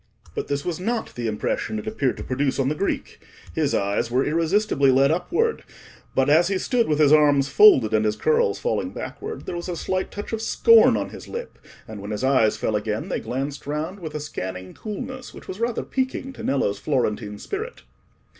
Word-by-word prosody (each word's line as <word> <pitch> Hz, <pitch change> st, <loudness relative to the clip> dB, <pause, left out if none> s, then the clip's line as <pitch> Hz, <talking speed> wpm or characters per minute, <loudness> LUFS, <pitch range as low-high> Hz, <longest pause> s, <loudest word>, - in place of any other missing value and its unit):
But -, -, -4 dB
this 140 Hz, 0 st, -2 dB
was 175 Hz, -2 st, -2 dB
not 230 Hz, +5 st, -2 dB
the 120 Hz, -1 st, -3 dB
impression 110 Hz, -, -2 dB
it 215 Hz, -, -5 dB
appeared 180 Hz, -, -1 dB
to -, -, -6 dB
produce 135 Hz, +1 st, -1 dB
on 135 Hz, -1 st, +1 dB
the -, -, +1 dB
Greek. 195 Hz, +6 st, -3 dB, 0.3 s
His 150 Hz, -3 st, +1 dB
eyes 100 Hz, +4 st, 0 dB
were 125 Hz, +3 st, +1 dB
irresistibly 165 Hz, -2 st, +2 dB
led 135 Hz, +2 st, +4 dB
upward, 305 Hz, -, 0 dB, 0.5 s
but 135 Hz, 0 st, +3 dB
as 160 Hz, +4 st, +5 dB
he 195 Hz, 0 st, 0 dB
stood 240 Hz, +4 st, +1 dB
with 150 Hz, -, +1 dB
his 150 Hz, -1 st, +5 dB
arms 145 Hz, -2 st, +4 dB
folded 135 Hz, -, +6 dB
and 110 Hz, 0 st, +3 dB
his 105 Hz, -1 st, +1 dB
curls 465 Hz, +1 st, +2 dB
falling 485 Hz, -, -2 dB
backward, 440 Hz, +2 st, -6 dB
there -, -, -4 dB
was 175 Hz, +1 st, -5 dB
a 175 Hz, -, -2 dB
slight 185 Hz, +2 st, -2 dB
touch 205 Hz, +2 st, -7 dB
of 220 Hz, -, -2 dB
scorn 460 Hz, -, +5 dB
on -, -, -3 dB
his -, -, -10 dB
lip, 480 Hz, +1 st, -7 dB, 0.3 s
and 110 Hz, -3 st, -8 dB
when 100 Hz, -, -7 dB
his 105 Hz, +3 st, -3 dB
eyes 130 Hz, -5 st, +3 dB
fell 110 Hz, -, -1 dB
again 105 Hz, 0 st, -2 dB
they -, -, -1 dB
glanced 135 Hz, +3 st, -4 dB
round 155 Hz, +7 st, -3 dB
with 160 Hz, -4 st, -7 dB
a -, -, -2 dB
scanning 95 Hz, -10 st, -6 dB
coolness 250 Hz, +4 st, -7 dB
which -, -, -12 dB
was 185 Hz, -, -6 dB
rather 235 Hz, 0 st, -1 dB
piquing 260 Hz, 0 st, -3 dB
to -, -, -10 dB
Nello's 105 Hz, -7 st, 0 dB
Florentine 105 Hz, -5 st, -1 dB
spirit. 435 Hz, -, -6 dB
150 Hz, 205 wpm, -23 LUFS, 130-215 Hz, 0.5 s, folded